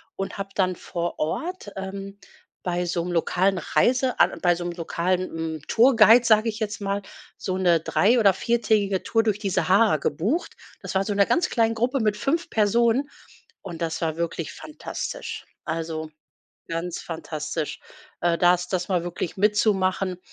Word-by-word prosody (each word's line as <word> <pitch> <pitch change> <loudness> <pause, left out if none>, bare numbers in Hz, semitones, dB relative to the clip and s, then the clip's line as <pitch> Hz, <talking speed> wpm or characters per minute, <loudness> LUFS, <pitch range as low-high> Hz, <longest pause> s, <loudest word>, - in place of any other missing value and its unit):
und 195 +1 -5
hab 195 0 -6
dann 185 -2 +1
vor 170 0 -4
Ort, 320 - -3
ähm, 195 +1 -6 0.4
bei 180 0 -1
so 170 -1 -1
’nem 180 - -4
lokalen 185 +3 +1
Reise 255 +6 +1 0.3
bei 175 -2 +4
so 175 - -5
’nem 175 - -3
lokalen, 175 +2 0
hm, 160 -1 -4
Tourguide, 235 -1 +6
sage 220 0 +4
ich 215 - -5
jetzt 215 0 -3
mal, 200 0 -1 0.4
so 185 -1 -3
’ne 175 -3 +3
drei 235 +8 +3
oder 200 -3 +5
viertägige 210 -2 +1
Tour 225 -1 +1
durch 210 -2 0
die 200 -2 -2
Sahara 195 -1 +3
gebucht. 200 - -1 0.3
Das - - -6
war 190 - +3
in - - -8
so 205 - 0
einer 200 0 +4
ganz 360 0 +2
kleinen 225 -1 +2
Gruppe 250 +4 0
mit 210 -1 +1
5 325 +10 -1
Personen 235 +5 +2 0.5
und 170 -3 -7
das 160 -1 -2
war 160 -1 -1
wirklich 170 -1 -3
fantastisch. 305 - -6 0.2
Also, 160 -1 -4 0.6
ganz 165 +1 -3
fantastisch, 155 -1 -4 0.4
äh, 170 -1 +2
das 180 0 +3
das 180 -1 -2
mal 175 -2 0
wirklich 175 -1 -4
mitzumachen. 195 -3 +1
195 Hz, 165 wpm, -24 LUFS, 175-220 Hz, 0.6 s, Tourguide